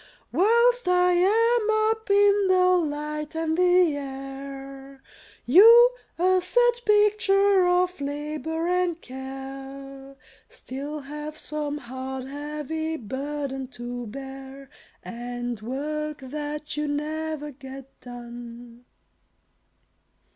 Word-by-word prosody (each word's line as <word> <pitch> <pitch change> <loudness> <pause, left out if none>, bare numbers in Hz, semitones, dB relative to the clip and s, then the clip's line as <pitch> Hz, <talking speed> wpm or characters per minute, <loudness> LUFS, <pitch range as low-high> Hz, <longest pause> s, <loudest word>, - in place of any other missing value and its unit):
Whilst 470 +4 +3
I 360 0 +4
am 435 +3 +3
up 445 -1 -5
in 405 0 +4
the 365 -2 +4
light 300 +1 -5
and 320 0 -1
the 360 -3 +4
air, 270 0 -8 0.4
You, 460 - +8 0.3
a 370 +2 +3
sad 485 +7 +3
picture 405 -2 +4
of 360 -2 +1
labor 305 +3 -3
and 360 -2 0
care, 270 0 -9 0.3
Still 285 +3 -7
have 300 +2 -7
some 295 -1 -4
hard, 260 0 -6
heavy 300 +3 -4
burden 270 +2 -4
to 240 0 -6
bear, 270 +2 -9 0.3
And 240 -1 -5
work 300 +5 -4
that 295 +2 -5
you 300 0 -2
never 300 +1 -3
get 270 0 -10 0.2
done. 240 0 -10
295 Hz, 95 wpm, -25 LUFS, 270-360 Hz, 0.4 s, You